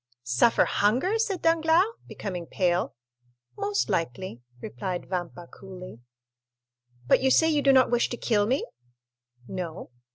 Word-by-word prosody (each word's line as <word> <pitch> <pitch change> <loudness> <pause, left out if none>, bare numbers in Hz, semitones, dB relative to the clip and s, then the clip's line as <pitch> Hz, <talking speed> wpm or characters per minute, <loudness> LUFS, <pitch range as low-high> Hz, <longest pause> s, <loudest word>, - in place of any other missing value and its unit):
"Suffer 125 - +3
hunger?" 260 - +1
said 405 -5 -1
Danglars, 330 +2 +4 0.2
becoming 180 -4 -6
pale. 180 -1 0 0.6
"Most 405 0 -1
likely," 165 - -3 0.2
replied 175 +10 -5
Vampa 175 -1 -5
coolly. 185 - -11 1.1
"But 125 - +4
you 265 - +3
say 320 +4 +4
you 300 -2 +2
do 275 - +5
not 260 -2 +4
wish 240 -1 +2
to 240 - -5
kill 210 -4 +1
me?" 260 +5 0 0.8
"No." 180 -6 -6
205 Hz, 130 wpm, -26 LUFS, 175-295 Hz, 1.1 s, do